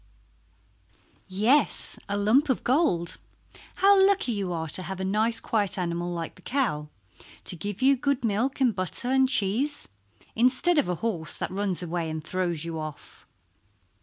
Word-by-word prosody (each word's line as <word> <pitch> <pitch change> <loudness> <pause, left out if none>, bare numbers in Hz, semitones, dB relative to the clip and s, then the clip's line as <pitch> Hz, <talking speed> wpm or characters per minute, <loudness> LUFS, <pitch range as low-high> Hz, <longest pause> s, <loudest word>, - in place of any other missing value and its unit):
"Yes, 215 +10 +2
a 200 - -1
lump 230 +9 +3
of 260 - 0
gold. 245 - +1 0.6
How 395 0 +5
lucky 390 -9 +2
you 200 -4 -2
are 160 -2 -3
to 185 - -3
have 185 +1 -6
a - - -2
nice 220 +4 +2
quiet 210 -4 0
animal 175 -1 -2
like 170 -1 -4
the - - -19
cow 215 - -1 0.5
to - - -2
give 205 +6 -5
you 275 +1 +6
good 270 -1 -1
milk 230 +7 0
and 250 -4 +3
butter 190 +7 -3
and 265 0 +3
cheese, 260 +6 0 0.5
instead 255 +8 +3
of 275 - 0
a 180 - 0
horse 170 -9 -2
that - - -4
runs 190 -2 0
away 170 -1 -3
and 155 -1 -5
throws 175 -2 -2
you 165 -1 -4
off." 155 -1 -9
205 Hz, 165 wpm, -26 LUFS, 175-260 Hz, 0.6 s, you